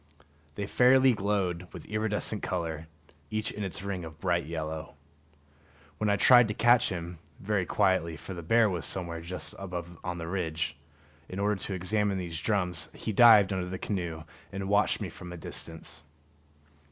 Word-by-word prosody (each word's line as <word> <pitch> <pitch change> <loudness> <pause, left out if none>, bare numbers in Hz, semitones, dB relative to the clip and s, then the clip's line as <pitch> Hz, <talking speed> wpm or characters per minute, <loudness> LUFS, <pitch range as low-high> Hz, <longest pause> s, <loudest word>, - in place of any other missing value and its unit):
They 100 - -3
fairly 130 +4 +5
glowed 95 -4 -1
with - - -9
iridescent 105 0 -1
color, 80 -3 -3 0.4
each 110 0 -2
in 105 - -5
its 95 -1 -4
ring 100 -3 -3
of 80 -1 -10
bright - - 0
yellow. 80 -1 -5 1.0
When 105 - +1
I 100 - +4
tried 120 +3 +7
to 105 - -3
catch 120 0 +5
him 85 -2 -5 0.2
(very 100 -3 -1
quietly, 95 -5 +1
for 95 - -8
the 85 - -6
bear 115 +7 +4
was 90 -5 -1
somewhere 85 -3 -3
just 90 +2 -4
above 90 -3 -6
on 90 -1 -3
the 80 - -5
ridge) 85 -3 -2 0.5
in 90 - -6
order 100 +1 +1
to 95 0 -4
examine 100 +2 0
these 85 -3 -4
drums, 90 -6 +1
he 110 - -4
dived 105 -3 +7
under 90 -1 -2
the 95 - -4
canoe 85 -6 -3 0.3
and 95 0 -4
watched 105 +1 +2
me - - -3
from 90 -1 -10
a 90 - -7
distance. 80 -1 -7
95 Hz, 170 wpm, -29 LUFS, 85-105 Hz, 1.0 s, tried